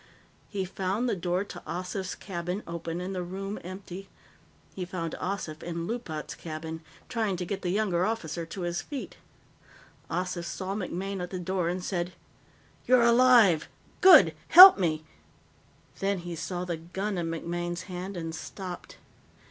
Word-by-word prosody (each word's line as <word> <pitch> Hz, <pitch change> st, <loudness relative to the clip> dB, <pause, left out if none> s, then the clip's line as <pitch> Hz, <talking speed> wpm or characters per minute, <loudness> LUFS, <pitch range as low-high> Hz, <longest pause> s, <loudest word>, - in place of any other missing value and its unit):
He 195 Hz, -2 st, -2 dB
found 195 Hz, +6 st, -1 dB
the 235 Hz, -, +1 dB
door 180 Hz, +1 st, -1 dB
to 180 Hz, -3 st, -9 dB
Ossif's 185 Hz, +2 st, -4 dB
cabin 180 Hz, +1 st, -4 dB
open 170 Hz, 0 st, -4 dB
and 185 Hz, +2 st, -4 dB
the 185 Hz, -, -2 dB
room 195 Hz, +3 st, -5 dB
empty. 185 Hz, +1 st, -8 dB, 0.6 s
He 185 Hz, -, -4 dB
found 175 Hz, -2 st, -4 dB
Ossif 180 Hz, -5 st, -4 dB
in 170 Hz, -1 st, -4 dB
Loopat's 175 Hz, -, -4 dB
cabin, 160 Hz, 0 st, -6 dB, 0.3 s
trying 220 Hz, -5 st, -1 dB
to 180 Hz, -, -3 dB
get 195 Hz, +2 st, -4 dB
the 180 Hz, -, -2 dB
younger 185 Hz, -3 st, +1 dB
officer 175 Hz, -6 st, -2 dB
to 185 Hz, -, -7 dB
his 175 Hz, 0 st, -2 dB
feet. 285 Hz, -3 st, -7 dB, 0.9 s
Ossif 180 Hz, -1 st, -2 dB
saw 190 Hz, +2 st, -4 dB
MacMaine 195 Hz, -1 st, -3 dB
at 180 Hz, -, -4 dB
the 185 Hz, -, -4 dB
door 180 Hz, -1 st, -1 dB
and 180 Hz, +1 st, -3 dB
said: 180 Hz, -1 st, -2 dB, 0.7 s
"You're 250 Hz, -1 st, +6 dB
alive! 235 Hz, -8 st, +6 dB, 0.3 s
Good! 380 Hz, -1 st, +9 dB
Help 370 Hz, -, +11 dB
me 155 Hz, -4 st, 0 dB, 0.5 s
" -, -, -29 dB
Then 195 Hz, 0 st, 0 dB
he 175 Hz, -1 st, -6 dB
saw 180 Hz, +2 st, -4 dB
the 170 Hz, -2 st, -3 dB
gun 190 Hz, +4 st, -3 dB
in 170 Hz, -, -2 dB
MacMaine's 175 Hz, +1 st, -3 dB
hand 185 Hz, 0 st, -6 dB
and 165 Hz, -1 st, -4 dB
stopped. 180 Hz, +2 st, -7 dB
180 Hz, 155 wpm, -28 LUFS, 170-195 Hz, 0.9 s, Help